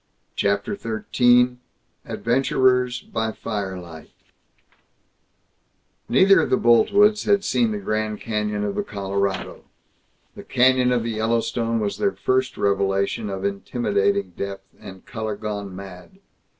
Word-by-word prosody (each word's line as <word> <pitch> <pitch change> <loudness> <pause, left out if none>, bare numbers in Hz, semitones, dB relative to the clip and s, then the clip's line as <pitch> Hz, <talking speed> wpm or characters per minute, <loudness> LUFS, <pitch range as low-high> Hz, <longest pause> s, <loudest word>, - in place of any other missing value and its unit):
CHAPTER 100 - 0
XIII 125 - +2 0.5
ADVENTURERS 125 0 +1
BY 110 0 -3
FIRELIGHT 95 -7 -6 2.0
Neither 195 +1 +5
of - - 0
the 130 - +3
Boltwoods 205 - +4
had 200 -1 +3
seen 235 +2 +1
the 215 - -2
Grand 110 - -2
Canyon 105 -1 -2
of 100 -1 -2
the - - -1
Colorado. 100 -1 -3 0.7
The - - -9
Canyon 130 0 +3
of 120 -2 +1
the 115 - -2
Yellowstone 115 +1 -1
was 105 -2 -3
their 200 -2 +1
first 130 0 -1
revelation 100 +1 0
of 95 0 -4
intimidating 100 -2 -1
depth 100 +1 -7
and 95 -1 -12
color 110 -2 -4
gone 100 -2 -5
mad. 95 - -11
110 Hz, 120 wpm, -22 LUFS, 100-125 Hz, 2.0 s, Neither